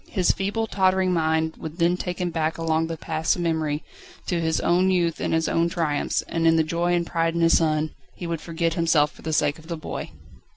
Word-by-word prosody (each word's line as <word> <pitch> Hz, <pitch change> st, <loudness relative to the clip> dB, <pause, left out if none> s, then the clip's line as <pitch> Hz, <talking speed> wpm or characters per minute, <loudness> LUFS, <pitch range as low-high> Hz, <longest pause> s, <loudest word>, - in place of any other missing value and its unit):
His 185 Hz, -4 st, +2 dB
feeble, 205 Hz, +3 st, -1 dB
tottering 190 Hz, -2 st, +2 dB
mind 160 Hz, -1 st, 0 dB
would 160 Hz, +1 st, -7 dB
then 170 Hz, 0 st, +3 dB
take 180 Hz, -1 st, -4 dB
him 180 Hz, -1 st, -1 dB
back, 160 Hz, -1 st, -1 dB
along 165 Hz, 0 st, 0 dB
the 165 Hz, 0 st, -5 dB
paths 160 Hz, 0 st, 0 dB
of 175 Hz, -, -3 dB
memory, 160 Hz, -3 st, -1 dB, 0.4 s
to 175 Hz, -2 st, -1 dB
his 160 Hz, -1 st, +1 dB
own 180 Hz, +2 st, +3 dB
youth 175 Hz, -3 st, +1 dB
and -, -, -1 dB
his 160 Hz, 0 st, +1 dB
own 170 Hz, +1 st, +1 dB
triumphs, 160 Hz, -4 st, -1 dB
and 165 Hz, 0 st, 0 dB
in 165 Hz, -, +5 dB
the 160 Hz, -, +4 dB
joy 170 Hz, +2 st, 0 dB
and 170 Hz, -1 st, 0 dB
pride 165 Hz, 0 st, 0 dB
in 170 Hz, -, 0 dB
his 165 Hz, 0 st, +5 dB
son, 155 Hz, -1 st, 0 dB, 0.2 s
he 175 Hz, -, -7 dB
would 165 Hz, -2 st, -3 dB
forget 165 Hz, 0 st, -1 dB
himself 160 Hz, -3 st, +2 dB
for -, -, -17 dB
the 160 Hz, -, -4 dB
sake 150 Hz, 0 st, +1 dB
of 160 Hz, -, -15 dB
the 170 Hz, -1 st, -4 dB
boy. 155 Hz, -, -6 dB
165 Hz, 235 wpm, -24 LUFS, 160-175 Hz, 0.4 s, in